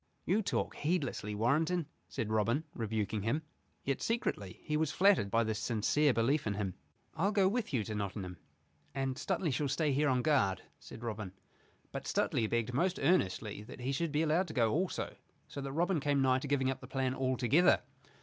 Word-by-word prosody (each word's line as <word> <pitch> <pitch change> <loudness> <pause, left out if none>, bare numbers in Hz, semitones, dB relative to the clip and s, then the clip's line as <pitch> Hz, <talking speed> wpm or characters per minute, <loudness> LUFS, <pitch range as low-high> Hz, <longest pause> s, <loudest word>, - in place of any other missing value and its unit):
"You 200 +6 +2
talk 200 - -1
heedlessly, 145 - -1
Warrenton," 155 +10 +1 0.2
said 110 -1 -3
Robin, 115 +7 +2
rebuking 110 -2 -2
him. 125 +10 0 0.4
Yet 135 -1 -1
secretly 105 - -2
he 150 - -1
was 155 -1 +1
flattered 190 - +4
by 115 +3 +3
this 110 -1 -2
sincere 130 +6 +2
belief 125 +4 +1
in 100 - -1
him. 100 -3 -2 0.4
"I'll 195 +6 +1
go 200 -3 +4
with 220 0 -1
you 120 -6 +1
to 110 - -5
Nottingham 100 -3 -4 0.6
and 135 -1 -1
Stuteley 175 0 -1
shall 145 +3 0
stay 145 +2 +1
here, 145 +2 +2
on 125 -1 +2
guard," 100 -11 +2 0.2
said 115 - -11
Robin. 105 -5 -4 0.6
But - - -5
Stuteley 110 - +1
begged 120 0 0
most 175 +8 +1
earnestly 110 - +1
that 125 - -10
he 130 +2 -1
should 160 +3 -1
be 150 +2 +2
allowed 165 +4 +2
to 155 - -8
go 115 -3 +3
also, 180 +4 -1 0.3
so 140 - -6
that 135 0 -4
Robin 170 +3 +1
came 145 0 +1
nigh 130 -1 +3
to 140 - -5
giving 135 -2 +2
up 135 - -5
the 130 - -9
plan 130 -1 -1
all 130 -1 0
together. 140 - +4
135 Hz, 195 wpm, -33 LUFS, 110-155 Hz, 0.6 s, flattered